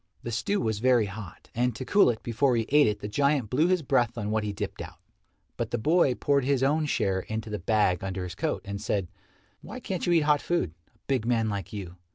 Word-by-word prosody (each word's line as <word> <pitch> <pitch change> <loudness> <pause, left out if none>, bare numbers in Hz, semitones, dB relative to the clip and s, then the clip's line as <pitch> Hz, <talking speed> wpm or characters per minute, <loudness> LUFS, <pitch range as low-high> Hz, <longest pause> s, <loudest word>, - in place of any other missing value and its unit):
The 120 - -4
stew 200 - 0
was 110 -2 -1
very 125 -2 +4
hot, 100 -2 -9
and 120 0 0
to 130 - -6
cool 205 0 +5
it 115 -2 -3
before 120 +2 +1
he 115 -1 0
ate 145 -1 +5
it 105 -1 -1
the - - -4
giant 140 0 +1
blew 150 +6 +3
his 180 -3 +1
breath 120 -2 +1
on 105 -2 -2
what 110 0 0
he 105 - -2
dipped 100 0 -5
out. - - -9 0.6
But - - -2
the - - -1
boy 150 +1 +3
poured 140 +1 +1
his 135 0 +1
own 150 +3 +2
share 95 -8 0
into 110 +3 -5
the 105 - -3
bag 95 -2 +1
under 95 -1 -3
his 90 -2 -6
coat, - - -2
and 100 0 -5
said, 100 -4 -1 0.5
"Why 230 +6 -8
can't 190 -8 -4
you 175 - +3
eat 165 - +5
hot 150 -1 +3
food 170 - -1
a - - -34
big 130 -5 -1
man 115 -2 +1
like 100 -3 -4
you? 95 -4 -7
115 Hz, 240 wpm, -27 LUFS, 105-140 Hz, 0.6 s, cool